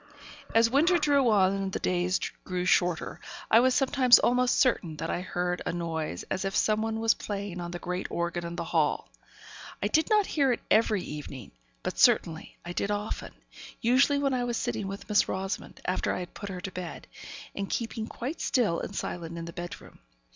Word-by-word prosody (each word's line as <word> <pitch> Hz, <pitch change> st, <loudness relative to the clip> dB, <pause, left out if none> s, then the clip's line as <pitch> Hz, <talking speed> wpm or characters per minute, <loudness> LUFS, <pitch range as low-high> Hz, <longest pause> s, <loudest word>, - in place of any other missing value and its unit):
As 230 Hz, 0 st, +6 dB
winter 310 Hz, +9 st, +4 dB
drew 285 Hz, -5 st, +3 dB
on, 195 Hz, -3 st, +4 dB
and 195 Hz, -1 st, -2 dB
the -, -, 0 dB
days 180 Hz, +1 st, 0 dB, 0.2 s
grew 180 Hz, -1 st, -3 dB
shorter, 175 Hz, -2 st, +1 dB, 0.3 s
I 225 Hz, -, +8 dB
was 255 Hz, +1 st, +3 dB
sometimes 265 Hz, -2 st, +6 dB
almost 250 Hz, +1 st, +2 dB
certain 185 Hz, -, +2 dB
that 165 Hz, +2 st, -3 dB
I 175 Hz, -, -2 dB
heard 180 Hz, -1 st, -2 dB
a -, -, -2 dB
noise 160 Hz, -, -3 dB
as 190 Hz, -, -1 dB
if 195 Hz, +1 st, -2 dB
someone 220 Hz, +1 st, +1 dB
was 225 Hz, 0 st, +4 dB
playing 200 Hz, -3 st, -5 dB
on 175 Hz, -, -5 dB
the 175 Hz, -, -5 dB
great 180 Hz, +1 st, -4 dB
organ 175 Hz, 0 st, -2 dB
in 170 Hz, 0 st, -5 dB
the -, -, -3 dB
hall. -, -, 0 dB, 0.7 s
I -, -, 0 dB
did 315 Hz, 0 st, +2 dB
not 425 Hz, -2 st, +4 dB
hear 280 Hz, -7 st, +2 dB
it 240 Hz, -, -1 dB
every 215 Hz, -3 st, +3 dB
evening; 140 Hz, -5 st, -8 dB, 0.3 s
but, -, -, -4 dB
certainly, 160 Hz, -1 st, +3 dB
I 175 Hz, -, -5 dB
did 200 Hz, -, -1 dB
very 205 Hz, 0 st, 0 dB
often, 210 Hz, -, -6 dB, 0.5 s
usually 260 Hz, +5 st, +4 dB
when 275 Hz, -1 st, +1 dB
I 250 Hz, -1 st, 0 dB
was 240 Hz, -1 st, -1 dB
sitting 195 Hz, -, -2 dB
with 195 Hz, +1 st, -7 dB
Miss 210 Hz, -1 st, +3 dB
Rosamond, 190 Hz, +1 st, -4 dB
after 185 Hz, -, 0 dB
I -, -, -2 dB
had 175 Hz, -, -8 dB
put 200 Hz, -, -7 dB
her 180 Hz, -2 st, -6 dB
to 190 Hz, -, -5 dB
bed, 180 Hz, -2 st, -7 dB, 0.5 s
and 195 Hz, -1 st, -4 dB
keeping 225 Hz, -1 st, -3 dB
quite 275 Hz, +9 st, -5 dB
still 215 Hz, -10 st, +1 dB
and 200 Hz, -, -6 dB
silent 170 Hz, -2 st, -4 dB
in 165 Hz, -, -5 dB
the 170 Hz, -, -8 dB
bedroom. 175 Hz, +1 st, -8 dB
195 Hz, 200 wpm, -28 LUFS, 175-240 Hz, 0.7 s, I